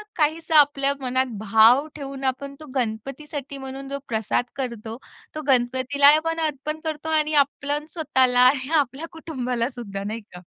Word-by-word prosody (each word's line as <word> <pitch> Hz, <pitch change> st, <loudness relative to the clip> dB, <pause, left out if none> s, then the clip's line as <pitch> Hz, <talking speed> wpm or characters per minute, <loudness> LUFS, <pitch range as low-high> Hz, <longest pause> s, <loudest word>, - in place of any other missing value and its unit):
काहीसा 320 Hz, +1 st, +1 dB
आपल्या 280 Hz, -1 st, +3 dB
मनात 260 Hz, 0 st, 0 dB
भाव 220 Hz, +7 st, +5 dB
ठेवून 275 Hz, -2 st, -7 dB
आपण 270 Hz, +1 st, -2 dB
तो 310 Hz, -, -10 dB
गणपतीसाठी 275 Hz, +4 st, -4 dB
म्हणून 270 Hz, 0 st, -7 dB
जो 280 Hz, -, -3 dB
प्रसाद 220 Hz, +1 st, 0 dB
करतो, 235 Hz, -4 st, -5 dB, 0.4 s
तो 310 Hz, -, -3 dB
गणपतीला 260 Hz, +2 st, +3 dB
आपण 325 Hz, +1 st, -2 dB
अर्पण 305 Hz, 0 st, -2 dB
करतो 315 Hz, -1 st, -4 dB
आणि 305 Hz, 0 st, -1 dB
आपल्या 290 Hz, +1 st, -4 dB
स्वतःला 260 Hz, -6 st, +2 dB
आणि 265 Hz, 0 st, -2 dB
आपल्या 275 Hz, +3 st, -2 dB
कुटुंबाला 255 Hz, -7 st, -3 dB
सुद्धा, 210 Hz, -7 st, -7 dB
नाही 215 Hz, +3 st, -4 dB
का? 180 Hz, -4 st, -14 dB
275 Hz, 150 wpm, -23 LUFS, 245-295 Hz, 0.4 s, भाव